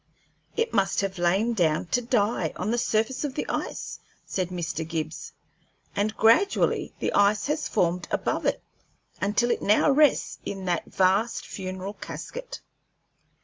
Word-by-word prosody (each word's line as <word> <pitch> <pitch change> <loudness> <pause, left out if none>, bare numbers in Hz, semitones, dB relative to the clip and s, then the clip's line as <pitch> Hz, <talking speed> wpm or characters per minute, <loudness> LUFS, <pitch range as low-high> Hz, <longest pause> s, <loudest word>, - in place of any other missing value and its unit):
"It 460 +1 0
must 195 -2 +2
have 195 -2 -3
lain 195 +7 +2
down 165 -7 +1
to 245 - +2
die, 230 -2 +1
on 215 - -2
the 240 - +1
surface 225 +4 0
of 280 -3 -3
the - - -2
ice," - - -4 0.3
said 185 -2 -2
Mr. 170 -3 -3
Gibbs, 160 -1 -4 0.6
"and 215 +2 0
gradually 230 - +3
the - - -1
ice 205 +1 +3
has 300 +2 -1
formed 180 -3 0
above - - -1
it, - - 0 0.6
until 210 +4 +2
it - - 0
now 210 +8 +4
rests 295 +1 +3
in 195 -1 -5
that 175 -2 0
vast 195 +5 +1
funeral 190 +1 -5
casket." - - -7
205 Hz, 145 wpm, -26 LUFS, 185-240 Hz, 0.6 s, now